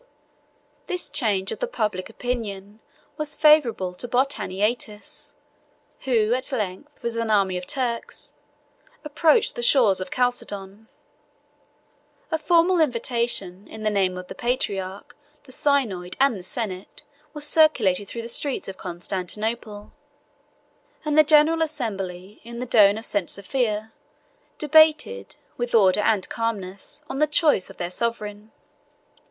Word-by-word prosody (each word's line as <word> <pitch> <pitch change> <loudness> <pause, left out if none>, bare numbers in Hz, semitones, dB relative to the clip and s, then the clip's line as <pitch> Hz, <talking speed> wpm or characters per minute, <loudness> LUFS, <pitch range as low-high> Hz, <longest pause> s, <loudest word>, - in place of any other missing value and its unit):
This 360 -1 -2
change 200 -7 +1
of - - -5
the - - -1
public 210 - -2
opinion 215 -4 -5 0.4
was 305 -1 -4
favorable 280 -12 +4
to 210 +7 -7
Botaniates, 215 -3 -2 0.7
who 230 -3 +2
at 255 +2 -1
length, 220 +4 -4
with 235 -1 -2
an 230 -1 -1
army 195 -3 +2
of 180 0 -5
Turks, 245 -4 -3 0.7
approached 300 +1 +3
the - - -5
shores 235 -6 +4
of 185 - -5
Chalcedon. 215 -4 -2 1.4
A 320 - 0
formal 340 +3 +3
invitation, 235 - -1
in 220 - -9
the 215 - +1
name 190 -3 +1
of 180 - -7
the - - -7
patriarch, 200 -6 -3 0.3
the 260 - -15
synod, 240 -11 0
and 275 -3 +4
the 190 - -7
senate, 185 -1 -6 0.3
was 295 0 -2
circulated 235 - +3
through 230 +3 -6
the - - -6
streets 270 +3 -1
of 195 - -7
Constantinople; 205 +4 -4 1.1
and 300 -1 0
the 310 - +8
general 310 +2 +4
assembly, 200 - -4
in 235 +1 -9
the 250 - -3
dome 210 -4 +5
of 225 - -5
St. 200 -5 -1
Sophia, 220 0 -2 0.6
debated, 305 - +3 0.2
with 240 -1 -1
order 195 -2 +5
and 210 -3 +1
calmness, 210 +2 -4
on 270 - -5
the 305 - +4
choice 300 - +2
of - - -13
their 175 0 -4
sovereign. 215 -1 -4
225 Hz, 135 wpm, -24 LUFS, 195-270 Hz, 1.4 s, the